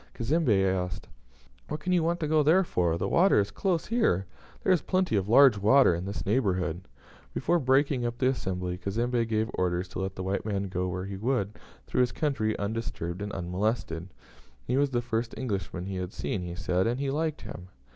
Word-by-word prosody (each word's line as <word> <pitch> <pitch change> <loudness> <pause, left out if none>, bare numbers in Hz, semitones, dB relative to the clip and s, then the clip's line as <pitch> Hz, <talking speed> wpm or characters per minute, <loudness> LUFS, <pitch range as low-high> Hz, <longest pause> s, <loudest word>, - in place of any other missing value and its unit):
Cazembe 120 -6 +2
asked, 90 -2 -2 0.6
"What 150 - -4
can 180 +4 -1
you 175 - +4
want 170 +2 0
to 155 - 0
go 155 0 +3
there 165 +6 +5
for? 85 - 0
The - - -1
water 185 +3 +4
is 100 - 0
close 180 -4 0
here. 215 - +1 0.4
There - - +3
is 175 - +2
plenty 185 - 0
of 100 0 0
large 125 -3 +7
water 110 +1 +5
in 85 +2 -3
this 100 +1 -5
neighbourhood." 95 -6 0 0.5
Before 175 - +2
breaking 135 -1 +2
up 120 0 -2
the 130 0 +2
assembly, 90 -7 -3
Cazembe 115 +4 0
gave 110 0 0
orders 90 0 -1
to - - -6
let 95 0 -3
the 95 - -5
white 95 +1 -1
man 100 -2 -2
go 90 0 -2
where 90 +1 -3
he 100 0 -6
would 110 -2 -1 0.3
through 125 - 0
his 125 -1 +2
country 120 -8 0
undisturbed 100 -4 -4
and 105 0 -4
unmolested. 90 -1 -2 0.6
He 125 - 0
was 140 +1 +3
the 120 -2 -1
first 115 0 -2
Englishman 100 -6 -3
he 95 -1 -4
had 90 +1 -4
seen, 100 - -3
he 85 -1 -5
said, 90 +2 0
and 120 +3 -1
he 140 -1 -1
liked 155 +1 -1
him. 90 - -9
110 Hz, 205 wpm, -28 LUFS, 95-135 Hz, 0.6 s, large